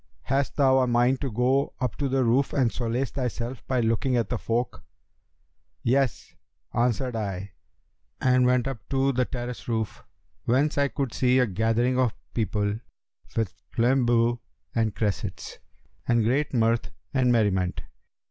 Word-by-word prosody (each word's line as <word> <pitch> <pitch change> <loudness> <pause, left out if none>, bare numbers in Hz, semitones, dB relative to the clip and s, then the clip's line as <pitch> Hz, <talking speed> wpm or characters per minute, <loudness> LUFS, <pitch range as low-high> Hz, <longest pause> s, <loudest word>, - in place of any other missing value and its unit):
Hast 135 0 0
thou 135 -2 +4
a 130 - +2
mind 120 +2 +2
to 140 - -1
go 125 +5 +1
up 125 -4 -1
to 140 -2 -1
the 130 0 +2
roof 125 +4 +2
and 125 -5 +2
solace 120 +2 -2
thyself 125 -2 -3
by 130 -2 +1
looking 115 +3 +1
at 115 - 0
the 125 - -1
folk?' 120 +2 -2 1.0
'Yes,' 130 +1 0 0.4
answered 125 +1 0
I, 100 -3 -4 0.7
and 125 -1 +4
went 125 0 +2
up 135 -4 -4
to 135 0 +2
the 125 -1 +1
terrace 120 0 -6
roof,[FN#284] 110 -2 -2 0.4
whence 140 +6 +2
I 140 - +4
could 135 -1 -3
see 125 0 +3
a 125 - +5
gathering 115 +5 +1
of 125 -4 +2 0.2
people 105 -2 -1 0.6
with 110 -5 0 0.2
flambeaux 120 -1 +2 0.3
and 110 -3 0
cressets, 100 -6 -3 0.5
and 120 -1 +3
great 135 +7 +1
mirth 115 -1 +1 0.2
and 130 -2 +3
merriment. 95 -6 +1
120 Hz, 150 wpm, -26 LUFS, 115-130 Hz, 1.0 s, a